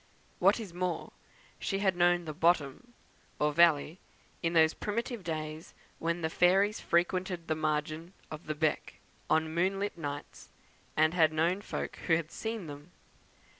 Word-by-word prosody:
What -, -, +4 dB
is 205 Hz, -6 st, -7 dB
more, 180 Hz, -1 st, -3 dB, 0.5 s
she 195 Hz, -, -1 dB
had 195 Hz, -2 st, +1 dB
known 175 Hz, 0 st, +3 dB
the 155 Hz, -, -5 dB
"bottom," 165 Hz, -, +1 dB, 0.4 s
or 150 Hz, 0 st, +1 dB
valley, 165 Hz, +1 st, +4 dB, 0.4 s
in 165 Hz, -1 st, 0 dB
those 160 Hz, -1 st, +5 dB
primitive 230 Hz, 0 st, -3 dB
days 155 Hz, -1 st, -5 dB, 0.2 s
when 170 Hz, +1 st, -1 dB
the 160 Hz, -, 0 dB
fairies 195 Hz, +5 st, +3 dB
frequented 180 Hz, 0 st, 0 dB
the 160 Hz, -, +1 dB
margin 155 Hz, +2 st, -2 dB, 0.2 s
of 155 Hz, +1 st, -8 dB
the 155 Hz, -, -2 dB
"beck" 155 Hz, 0 st, -1 dB, 0.3 s
on 160 Hz, 0 st, +2 dB
moonlight 195 Hz, +2 st, 0 dB
nights, 145 Hz, -2 st, -6 dB, 0.5 s
and 155 Hz, +1 st, +4 dB
had 160 Hz, -3 st, +4 dB
known 170 Hz, +5 st, +1 dB
folk -, -, -5 dB
who 165 Hz, -, +5 dB
had 160 Hz, -1 st, -3 dB
seen 220 Hz, -4 st, -4 dB
them. 145 Hz, +1 st, -10 dB
170 Hz, 150 wpm, -31 LUFS, 155-185 Hz, 0.5 s, those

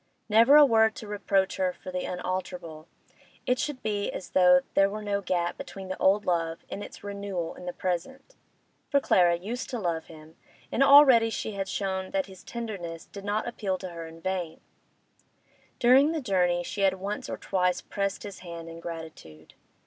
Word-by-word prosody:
Never 230 Hz, +6 st, +6 dB
a 300 Hz, -1 st, +9 dB
word 220 Hz, -3 st, +4 dB
to -, -, -8 dB
reproach 200 Hz, -2 st, 0 dB
her 185 Hz, -1 st, 0 dB
for 185 Hz, -, -9 dB
the 180 Hz, 0 st, -3 dB
unalterable; 180 Hz, -3 st, -5 dB, 0.6 s
it 250 Hz, 0 st, +1 dB
should 290 Hz, -4 st, -3 dB
be 205 Hz, -2 st, -1 dB
as -, -, -7 dB
though 180 Hz, -1 st, +6 dB
there 195 Hz, 0 st, +4 dB
were 215 Hz, +1 st, -6 dB
no 200 Hz, -1 st, -1 dB
gap 175 Hz, -2 st, -1 dB
between 190 Hz, -1 st, -8 dB
the 185 Hz, -, -4 dB
old 200 Hz, +2 st, +3 dB
love 165 Hz, -2 st, -1 dB
and 205 Hz, -, -5 dB
its -, -, -11 dB
renewal 200 Hz, -4 st, -4 dB
in 180 Hz, -, -11 dB
the -, -, -1 dB
present. 185 Hz, -, -4 dB, 0.5 s
For 280 Hz, -, +4 dB
Clara 175 Hz, -9 st, +4 dB
used 215 Hz, +9 st, -5 dB
to 250 Hz, -, -3 dB
love 170 Hz, -6 st, -2 dB
him, 160 Hz, 0 st, -14 dB, 0.3 s
and 250 Hz, -, 0 dB
already 275 Hz, -5 st, +8 dB
she 220 Hz, -, -4 dB
had 195 Hz, -2 st, -4 dB
shown 190 Hz, -1 st, -2 dB
that 190 Hz, -1 st, +1 dB
his 190 Hz, -2 st, -14 dB
tenderness 195 Hz, -9 st, -6 dB
did 200 Hz, -, -10 dB
not 210 Hz, +2 st, -1 dB
appeal 200 Hz, -5 st, -2 dB
to 185 Hz, 0 st, -7 dB
her 165 Hz, -1 st, -7 dB
in 165 Hz, 0 st, -13 dB
vain; 180 Hz, -3 st, -3 dB, 1.2 s
during 270 Hz, +6 st, +5 dB
the 325 Hz, -, -1 dB
journey 180 Hz, -8 st, +1 dB
she 200 Hz, -, -5 dB
had 190 Hz, -1 st, +3 dB
once 200 Hz, +2 st, -5 dB
or -, -, -4 dB
twice 180 Hz, -2 st, 0 dB
pressed 200 Hz, -1 st, -3 dB
his 200 Hz, -2 st, -8 dB
hand 170 Hz, -2 st, -8 dB
in 165 Hz, 0 st, -9 dB
gratitude. 160 Hz, -, -9 dB
190 Hz, 185 wpm, -27 LUFS, 175-215 Hz, 1.2 s, a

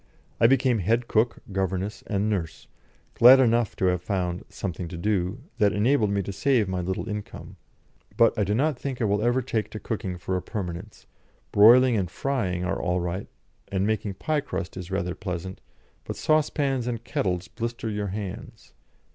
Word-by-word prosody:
I 115 Hz, -, +6 dB
became 130 Hz, -2 st, +3 dB
head 115 Hz, +6 st, +1 dB
cook, 115 Hz, +2 st, +1 dB
governess, 95 Hz, +1 st, -2 dB
and 100 Hz, 0 st, 0 dB
nurse, 95 Hz, -7 st, -3 dB, 0.5 s
glad 125 Hz, +3 st, +8 dB
enough 120 Hz, -3 st, +2 dB
to -, -, 0 dB
have 90 Hz, -1 st, +2 dB
found 90 Hz, 0 st, -2 dB
"something 90 Hz, -2 st, -5 dB
to 85 Hz, -, -7 dB
do" 100 Hz, +4 st, -1 dB, 0.2 s
that 100 Hz, -1 st, +4 dB
enabled 110 Hz, +1 st, +2 dB
me 100 Hz, 0 st, 0 dB
to 100 Hz, -, -5 dB
save 115 Hz, +2 st, +2 dB
my 95 Hz, -1 st, -2 dB
little 95 Hz, +4 st, -3 dB
income. 105 Hz, -1 st, -7 dB, 0.6 s
But 115 Hz, -, +5 dB
I 105 Hz, -, +1 dB
do 100 Hz, +1 st, 0 dB
not 140 Hz, +1 st, +1 dB
think 135 Hz, -3 st, -4 dB
I 115 Hz, -, +1 dB
will 105 Hz, 0 st, +1 dB
ever 120 Hz, +3 st, +2 dB
take 115 Hz, -4 st, -2 dB
to 110 Hz, -, -7 dB
cooking 95 Hz, -5 st, -4 dB
for 95 Hz, +1 st, -3 dB
a 90 Hz, -, -1 dB
permanence; 90 Hz, -6 st, -6 dB, 0.5 s
broiling 120 Hz, +4 st, +7 dB
and 95 Hz, -4 st, -1 dB
frying 95 Hz, -8 st, -2 dB
are 95 Hz, +2 st, -2 dB
all 90 Hz, 0 st, 0 dB
right, 90 Hz, +3 st, -3 dB, 0.4 s
and 95 Hz, 0 st, -1 dB
making 105 Hz, -2 st, -1 dB
pie 155 Hz, -, -1 dB
crust 95 Hz, -9 st, -5 dB
is 90 Hz, -1 st, -7 dB
rather 95 Hz, -2 st, -2 dB
pleasant; 95 Hz, -1 st, -6 dB, 0.4 s
but -, -, -5 dB
saucepans 140 Hz, -5 st, +1 dB
and 120 Hz, -2 st, -3 dB
kettles 95 Hz, -, -2 dB
blister 115 Hz, 0 st, -4 dB
your 105 Hz, -1 st, -2 dB
hands. 105 Hz, +3 st, -7 dB
105 Hz, 180 wpm, -26 LUFS, 95-120 Hz, 0.6 s, glad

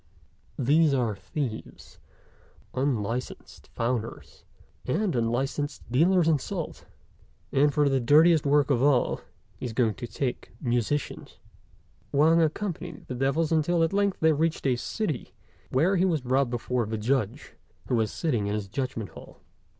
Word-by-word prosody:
These 145 Hz, +3 st, +3 dB
are 120 Hz, -5 st, 0 dB
thieves, 120 Hz, +2 st, -6 dB, 0.7 s
unlicensed 125 Hz, -3 st, -3 dB
founders, 115 Hz, -1 st, -4 dB, 0.4 s
and 180 Hz, +5 st, 0 dB
unlicensed 130 Hz, +5 st, -1 dB
dealers 170 Hz, +6 st, +4 dB
in 155 Hz, -3 st, +3 dB
salt, 170 Hz, +3 st, -6 dB, 0.6 s
and, 145 Hz, +2 st, +3 dB
for 145 Hz, 0 st, +2 dB
the 135 Hz, -1 st, +2 dB
dirtiest 155 Hz, +6 st, +5 dB
work 145 Hz, 0 st, +3 dB
of 125 Hz, -3 st, +2 dB
all, 140 Hz, -3 st, +2 dB, 0.4 s
he -, -, -3 dB
is 115 Hz, -, -6 dB
going 115 Hz, -2 st, +2 dB
to 120 Hz, +1 st, -7 dB
take 125 Hz, +1 st, -4 dB
musicians." 125 Hz, +3 st, -2 dB, 0.7 s
Wang 160 Hz, +4 st, +4 dB
accompanied 175 Hz, +1 st, -3 dB
the -, -, -6 dB
devils 140 Hz, +6 st, 0 dB
until 165 Hz, +1 st, +2 dB
at 165 Hz, -, 0 dB
length 200 Hz, -1 st, +1 dB
they 160 Hz, 0 st, +5 dB
reached 160 Hz, +1 st, -1 dB
a 130 Hz, -2 st, +3 dB
city, 155 Hz, -, -4 dB, 0.3 s
where 165 Hz, +10 st, +2 dB
he 180 Hz, -, +3 dB
was 165 Hz, -6 st, +1 dB
brought 130 Hz, +1 st, +1 dB
before 120 Hz, -1 st, -1 dB
the 110 Hz, 0 st, -3 dB
Judge, 115 Hz, -1 st, -1 dB, 0.3 s
who -, -, -3 dB
was 110 Hz, -2 st, +1 dB
sitting 120 Hz, -11 st, -1 dB
in 105 Hz, -, -1 dB
his 105 Hz, -2 st, -4 dB
Judgment 115 Hz, -1 st, -4 dB
hall. -, -, -13 dB
140 Hz, 145 wpm, -27 LUFS, 120-160 Hz, 0.7 s, dirtiest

